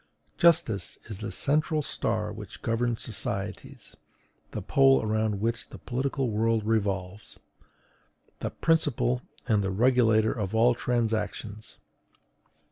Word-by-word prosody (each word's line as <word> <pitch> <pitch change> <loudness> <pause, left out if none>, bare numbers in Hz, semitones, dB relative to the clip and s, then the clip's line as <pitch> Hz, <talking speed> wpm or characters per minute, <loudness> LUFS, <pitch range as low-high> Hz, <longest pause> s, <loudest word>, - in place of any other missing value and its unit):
Justice 155 - +3
is 100 -3 -6
the - - -5
central 155 +2 +1
star 110 -5 -2
which 105 -3 -10
governs 115 0 -1
societies, 100 -2 -5 0.5
the - - -6
pole 135 -1 +5
around 110 -1 0
which 115 +3 -2
the - - -10
political 130 0 -2
world 110 0 +1
revolves, 100 -3 -2 1.0
the - - -2
principle 145 -6 +1 0.3
and 105 -4 +2
the 95 - -1
regulator 110 0 +3
of 105 -2 -3
all 120 +2 +5
transactions. 110 -3 -2
110 Hz, 115 wpm, -27 LUFS, 105-125 Hz, 1.0 s, pole